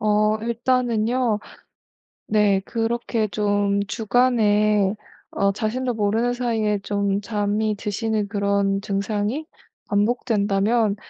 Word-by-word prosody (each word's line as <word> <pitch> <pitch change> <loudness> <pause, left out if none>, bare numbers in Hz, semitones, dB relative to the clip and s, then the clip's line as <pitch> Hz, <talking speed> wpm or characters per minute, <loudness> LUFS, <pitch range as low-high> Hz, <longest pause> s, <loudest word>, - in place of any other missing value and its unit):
어 215 0 +2
일단은요. 235 0 0 0.9
네 210 -2 +3
그렇게 230 -1 -1
좀 205 -1 0
주간에 215 -3 +2 0.4
어 200 0 +1
자신도 240 +5 -2
모르는 225 +3 +1
사이에 225 -4 0
좀 200 0 -1
잠이 210 0 -1
드시는 210 +1 -2
그런 200 -1 0
증상이 205 +7 -2 0.4
반복된다면 210 -1 +1
215 Hz, 210 characters per minute, -22 LUFS, 205-230 Hz, 0.9 s, 네